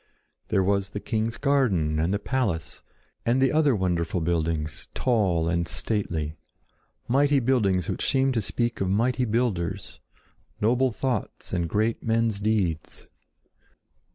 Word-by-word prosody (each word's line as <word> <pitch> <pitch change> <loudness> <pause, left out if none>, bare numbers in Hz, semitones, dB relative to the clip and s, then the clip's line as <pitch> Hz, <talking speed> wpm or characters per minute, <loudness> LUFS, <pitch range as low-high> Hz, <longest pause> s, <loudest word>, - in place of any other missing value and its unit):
There 95 - +2
was 100 0 +1
the 100 - -5
king's 110 +2 -2
garden 105 - +1
and 80 +3 +1
the 100 - +1
palace, 105 -7 -2 0.4
and 120 +3 +2
the 130 -1 +3
other 150 -4 +3
wonderful 90 -2 0
buildings, 80 -2 -2
tall 95 -10 +1
and 85 0 0
stately—mighty 105 - -2
buildings 105 -8 +2
which - - -1
seemed 135 0 +2
to 115 - +1
speak 120 +3 -2
of 95 - 0
mighty 125 +6 +1
builders, 110 -7 -2 0.6
noble 125 +4 +2
thoughts 125 -1 -3
and 85 -3 0
great 110 +5 0
men's 115 -2 +1
deeds. 100 -7 -1
105 Hz, 125 wpm, -26 LUFS, 85-125 Hz, 0.6 s, the